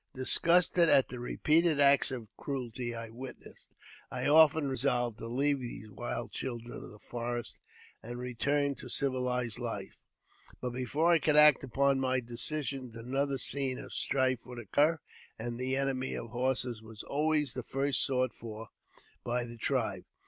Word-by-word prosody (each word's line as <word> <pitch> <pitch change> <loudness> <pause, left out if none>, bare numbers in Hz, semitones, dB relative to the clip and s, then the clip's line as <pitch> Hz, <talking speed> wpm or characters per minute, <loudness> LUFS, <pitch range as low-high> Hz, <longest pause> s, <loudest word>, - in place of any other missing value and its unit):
Disgusted 170 +5 +4
at 135 - +5
the 125 - -7
repeated 155 +5 +2
acts 140 0 +6
of 125 -5 -5
cruelty 120 -3 -4
I 115 -1 -6
witnessed, 125 +3 -11 0.4
I - - -4
often 155 0 +5
resolved 125 -3 0
to 115 - -6
leave 140 +4 +2
these 120 -4 -8
wild - - -5
children 120 -2 -5
of - - -10
the 105 - -13
forest 120 +2 -5 0.4
and 120 +2 -7
return 140 +4 0
to - - -5
civilized 125 -4 0
life; - - -5 0.6
but 125 - -3
before 140 +7 +1
I 170 - +5
could 150 -1 +2
act 150 -2 +7
upon 135 +1 +2
my 130 -1 +1
decision, 130 +2 -3
another 135 +4 -1
scene 130 0 -2
of - - -9
strife 130 -2 0
would 125 -1 -9
occur, 145 +8 +2 0.4
and 120 +1 -5
the 130 +1 -1
Enemy 135 -1 -1
of 115 - -6
Horses 125 -2 0
was 110 -1 -10
always 150 -2 +1
the 130 - -3
first 135 +3 0
sought 130 -2 0
for 110 -1 -9 0.5
by 120 0 -1
the 120 0 -9
tribe. - - -1
130 Hz, 155 wpm, -31 LUFS, 120-140 Hz, 0.6 s, act